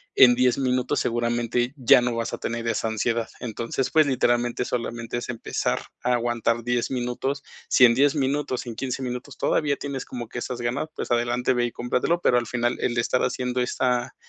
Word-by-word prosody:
en 125 -1 +8
10 125 0 +3
minutos 130 +1 0
seguramente 120 +1 0
ya 135 -1 +6
no 120 -1 -1
vas 115 0 -3
a - - -2
tener 115 0 -4
esa 115 0 0
ansiedad. 115 +1 -1
Entonces, 120 +3 -2
pues, 155 -1 +5
literalmente, 120 -2 +1
solamente 120 -1 -3
es 120 - -5
empezar 115 -2 -2 0.2
a 125 - +2
aguantar 120 -1 0
10 120 +1 -1
minutos. 130 +2 -2 0.3
Si 130 - +4
en 115 -1 +5
10 140 +2 +4
minutos, 140 -2 -1
en 115 - -5
15 130 +2 -3
minutos 125 +2 -5
todavía 145 -2 +1
tienes 140 -2 -5
como 120 -3 -7
que 120 - -5
esas 120 0 -5
ganas, 120 +6 -1
pues, - - -5
adelante, 120 +1 +1
ve 120 -1 +1
y 120 - -3
cómpratelo, 125 +9 0
pero 125 - +4
al 120 - 0
final 120 0 -1
el 120 - -1
estar 120 +2 +1
haciendo 125 0 -1
esta, 125 0 0
120 Hz, 195 wpm, -24 LUFS, 120-130 Hz, 0.3 s, en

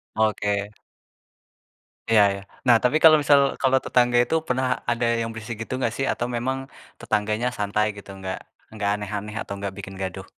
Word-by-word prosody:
Oke. 105 -1 0 1.4
Iya 110 -2 +6
iya. 100 - -7 0.3
Nah 120 - +7
tapi 125 +5 +3
kalau 160 -1 +9
misal 145 -1 +5 0.2
kalau 135 0 +3
tetangga 120 -1 +3
itu 160 - -1
pernah 130 0 0 0.2
ada 120 0 0 0.2
yang 115 - -2
berisik 115 +1 -6
gitu 130 - -7
enggak 120 -3 0
sih 135 - 0
atau 120 - -2
memang 130 +3 -1 0.4
tetangganya 110 +2 -1
santai 105 +1 0
gitu 100 -1 -12
enggak 95 -1 -5 0.3
enggak 105 -2 -2
aneh-aneh 105 +1 -5
atau 100 - -6
enggak 100 0 -4
bikin 95 -1 -8
gaduh? 95 -2 -5
110 Hz, 170 wpm, -24 LUFS, 100-125 Hz, 1.4 s, kalau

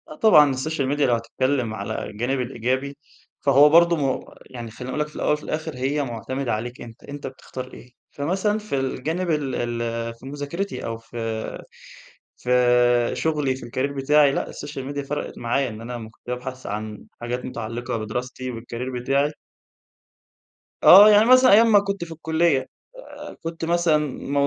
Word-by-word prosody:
آه 155 - -9
طبعًا 150 -9 +6
الsocial 140 +1 -2
media 145 - -3
لو 125 -4 +3
هتتكلم 120 +1 -1
على 110 0 -4
الجانب 125 +5 -2
الإيجابي 130 +3 -2 0.4
فهو 140 +1 +6
برضو 170 +2 +6
م 140 -4 -1 0.2
يعني 120 -3 -8
خليني 125 +3 -8
أقول 150 - -3
لك 150 - -1
في 150 - -18
الأول - - 0
وفي 150 - -4
الآخر 155 -1 -4
هي 135 +3 -1
معتمدة 130 +1 -3
عليك 120 +3 -5
أنت، 115 -1 -11
أنت 145 0 -7
بتختار 130 0 -9
إيه. 125 - -13 0.2
فمثلًا 190 +8 -1
في 210 -8 -4
الجانب 160 +7 -2
ال 145 -4 -1
ال 120 -1 -2 0.3
في 115 - -16
مذاكرتي 145 +8 -4
أو 115 0 -4
في 115 +1 -12 1.2
في 125 - -4 0.6
شغلي 150 -5 0
في 130 - -9
الcareer 130 +4 -2
بتاعي، 145 +1 +4
لأ - - -3
الsocial 140 -2 -7
media 140 -1 -5
فرَقِت 150 - -4
معايا 125 +3 0
إن 110 0 -9
أنا 115 -1 -7
كنت 115 - -29
بابحث 125 +1 -5
عن 105 0 -5 0.2
حاجات 120 +1 -4
متعلقة 115 0 -4
بدراستي 125 +3 -4
والcareer 120 +2 -5
بتاعي. 140 +3 +1 1.5
آه، 205 +3 +10
يعني 210 +1 +6
مثلًا 255 +1 +7
أيام 225 +3 +6
ما 205 - +7
كنت 200 -2 -3
في 170 - -9
الكلية، 160 -4 0 0.4
آآ - - -10
كنت 165 0 -4
مثلًا 170 -2 +3
م 140 +1 -6
135 Hz, 165 wpm, -23 LUFS, 120-155 Hz, 1.5 s, آه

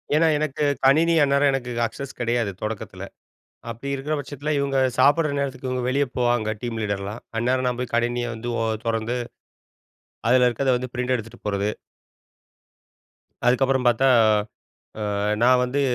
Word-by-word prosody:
ஏன்னா, 165 +1 +4
எனக்கு 150 -1 -2 0.2
கணினி 160 +5 +5
அந்நேரம் 140 0 +3
எனக்கு 125 -2 -3 0.2
அக்சஸ் 135 +4 -9
கிடையாது, 120 -3 0
தொடக்கத்தில. 105 -1 -5 0.7
அப்பிடி 140 +5 -5
இருக்கிற 150 +3 -3
பட்சத்தில, 145 +2 -5
இவுங்க 140 -1 0 0.2
சாப்பிடற 145 +3 +4
நேரத்துக்கு 130 -2 -3
இவுங்க 125 -1 -2
வெளியே 140 +2 +1
போவாங்க, 120 -3 +1
டீம் 115 -2 -3
லீடர்லாம். 100 +1 -4 0.2
அந்நேரம் 125 +2 +1
நான் 125 0 -3
போய் 125 -1 -4
கணினிய 120 +1 0
வந்து 120 +2 -5
ஓ - - +1 0.2
தொறந்து, 115 +2 -1 1.1
அதில 125 -1 +5
இருக்கத 130 +3 0
வந்து 125 -1 -6
பிரிண்ட் 125 +1 0
எடுத்துட்டு 115 0 -9
போறது. 100 0 0 1.8
அதுக்கப்புறம் 130 +1 +2
பார்த்தா, 120 +3 +3 1.1
ஆ - - -2 0.3
நான் 125 +1 +5
வந்து 135 +3 -1
125 Hz, 140 wpm, -23 LUFS, 120-140 Hz, 1.8 s, கணினி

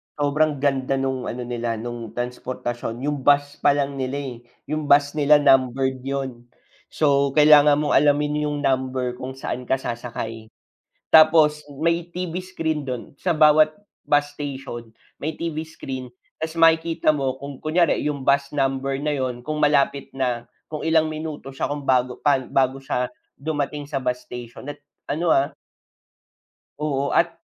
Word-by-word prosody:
Sobrang 145 0 +1
ganda 135 -1 +1
nung 135 -1 -2
ano 125 +1 -4
nila 120 -1 -3
nung 115 -1 -6
transportasyon, 120 -1 -4
yung 145 -2 -3
bus 145 0 +3
palang 140 -1 +1
nila, 130 -1 -4 0.2
yung 155 -1 -3
bus 140 0 +5
nila 145 0 +5
numbered 130 -1 +3
yun. 130 -3 -4 0.4
So 140 -2 +1
kailangan 150 -1 +6
mong 145 - -1
alamin 150 +1 +2
yung 145 0 -3
number 130 -2 -1
kung 130 +1 -6
saan 125 -1 -5
ka 130 - +2
sasakay. 115 -3 -5 0.6
Tapos 155 -1 +6 0.2
may 170 +1 +1
TV 180 -1 -4
screen 160 -5 -3
dun 125 +1 -6
sa 175 +4 0
bawat 155 0 +5 0.3
bus 145 0 +1
station, 130 -5 -6 0.2
may 155 +2 -3
TV 160 -1 -4
screen. 130 -6 -7 0.2
Tas 160 0 -4
makikita 165 -1 +3
mo 135 -2 -2
kung 140 0 -7
kunyari 160 +3 +1
yung 145 -2 -2
bus 140 +1 +1
number 135 -1 -1
na 150 0 -1
yun, 130 -2 -3
kung 155 +5 -4
malapit 140 -2 +1
na, 125 -3 -2 0.2
kung 155 0 -5
ilang 160 -1 +3
minuto 155 -3 -6
siya 135 - -4
kung 145 -1 -4
bago 125 -1 +2
pa 140 -3 +2
bago 130 +1 +1
siya 130 -2 -2 0.3
dumating 145 -1 -3
sa 145 - -4
bus 125 0 -2
station 125 +2 -9
at 145 - -5 0.3
ano, 160 +3 +1
ah 135 +1 +1 1.2
Oo, 140 -2 -1
at - - +2
140 Hz, 150 wpm, -23 LUFS, 130-150 Hz, 1.2 s, kailangan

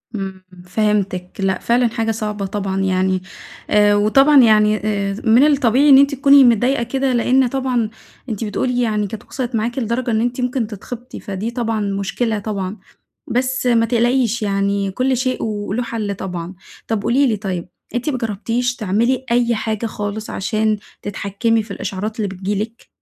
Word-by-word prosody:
امم، 190 -2 -5 0.2
فهمتك. 195 -2 -1
لأ 190 -1 0
فعلًا 240 +1 +2
حاجة 225 -1 -1
صعبة 210 -2 -3
طبعًا 195 -1 -2
يعني. 185 0 +1 0.5
آآ، 205 0 +4
وطبعًا 270 +7 +5
يعني، 215 -1 +4
آآ، 200 -2 -2
من 235 +4 +5
الطبيعي 275 -1 +3
إن 270 - +9
أنتِ 280 +1 +4
تكوني 275 +1 +6
متضايقة 245 +2 +3
كده؛ 265 +3 -3
لأن 255 +2 +3
طبعًا 250 -3 -1 0.4
أنتِ 220 -1 -3
بتقولي 245 +3 -1
يعني 210 -3 0
كانت 215 +2 -8
وصلت 250 -3 -4
معاكِ 230 +4 -1
لدرجة 235 +1 -1
إن 220 0 +1
أنتِ 245 +2 -1
ممكن 250 -2 -1
تتخبطي، 235 +4 -8
فدي 200 +3 -4
طبعًا 230 -2 -2
مشكلة 205 +3 -1
طبعًا. 200 -1 -4 0.5
بس 255 +2 -1
ما 230 -2 +3
تقلقيش 240 0 +1
يعني 200 -1 0
كل 255 +5 0
شيء 255 +1 -1
وله 210 +1 -2
حل 220 -4 -3
طبعًا. 180 -2 -5 0.3
طب 220 -3 -1
قولي 270 +5 +3
لي 220 -3 0
طيب، 185 -4 -4 0.3
أنتِ 245 +5 -1
ما 270 - -1
جربتيش 230 +2 -2
تعملي 235 +5 0
أي 240 0 +2
حاجة 220 0 -2
خالص 210 0 -4
عشان 215 +1 0 0.2
تتحكمي 205 +3 -1
في 210 - -12
الإشعارات 200 +2 -4
اللي 215 -3 -1
بتيجي 195 +2 -3
لك؟ 230 +2 -12
220 Hz, 165 wpm, -19 LUFS, 200-245 Hz, 0.5 s, إن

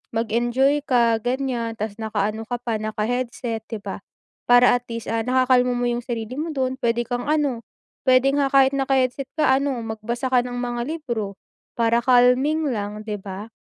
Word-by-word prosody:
mag-enjoy 240 +6 +1
ka, 235 -3 +3
ganyan, 245 -2 -2
tas 215 -1 -3
nakaano 215 0 -1
ka 245 - -2
pa, 230 -3 -1
naka-headset, 225 +1 -3
'di 220 -3 -5
ba, - - -5 0.5
para 245 0 +7
at 245 - -13
least, 230 -1 -5
ah, 225 0 0
nakakalma 250 -1 +3
mo 245 - 0
yung 240 0 -1
sarili 230 -1 -4
mo 325 +2 -2
dun, 260 -2 -1
puwede 235 0 +1
kang, 245 0 -3
ano, 285 -6 +1 0.5
puwede 260 +2 +5
nga 280 -1 +2
kahit 270 -1 +5
naka-headset 270 -1 0
ka, 305 - +3
ano, 275 -2 -1
magbasa 230 +4 -3
ka 250 - +5
ng 245 0 -5
mga 240 -1 -2 0.2
libro 220 -8 -4 0.4
para 235 0 +2
calming 255 +5 +3
lang, 210 -1 -4
'di 210 -1 -3
ba? 200 +3 -7
245 Hz, 170 wpm, -23 LUFS, 225-260 Hz, 0.5 s, para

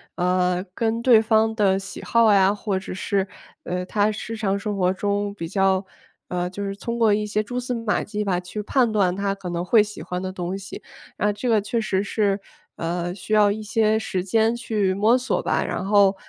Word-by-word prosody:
呃， 180 0 +1
跟 230 0 0
对 235 -2 +6
方 220 0 +2
的 195 -3 +2
喜 195 - -9
好 230 -2 +4
呀， 195 0 +5
或 205 -2 -2
者 190 - -6
是， 195 +1 -1 0.4
呃， 180 0 -3
他 210 0 +2
日 220 +1 -6
常 200 -2 0
生 205 -1 -3
活 185 -1 +2
中 205 +1 -1
比 170 -5 -6
较， 195 +1 +2 0.4
呃， 180 0 -2
就 190 +3 -6
是 195 0 -3
通 235 +3 -4
过 225 -2 +4
一 210 +1 +1
些 210 0 0
蛛 245 +4 -4
丝 250 0 -3
马 230 -3 -1
迹 210 0 -3
吧， 185 -3 0
去 180 +4 -6
判 240 +2 +2
断 190 -4 +2
他 200 0 -1
可 195 -2 -7
能 175 +1 -3
会 220 +2 +5
喜 210 0 -5
欢 180 0 -4
的 185 0 -4
东 180 0 -4
西。 195 -1 -8 0.3
那 210 0 +1
这 225 +5 -3
个 220 -2 +4
确 225 +3 -1
实 195 -2 0
是， 200 -1 0 0.4
呃， 175 +2 -3
需 205 +2 -5
要 210 -1 +5
一 215 +1 -4
些 220 0 +2
时 190 -4 -2
间 220 +4 +2
去 215 -5 0
摸 215 +5 +4
索 255 +1 -1
吧， - - 0
然 - - -3
后， 200 -1 +4
205 Hz, 230 characters per minute, -23 LUFS, 190-220 Hz, 0.4 s, 对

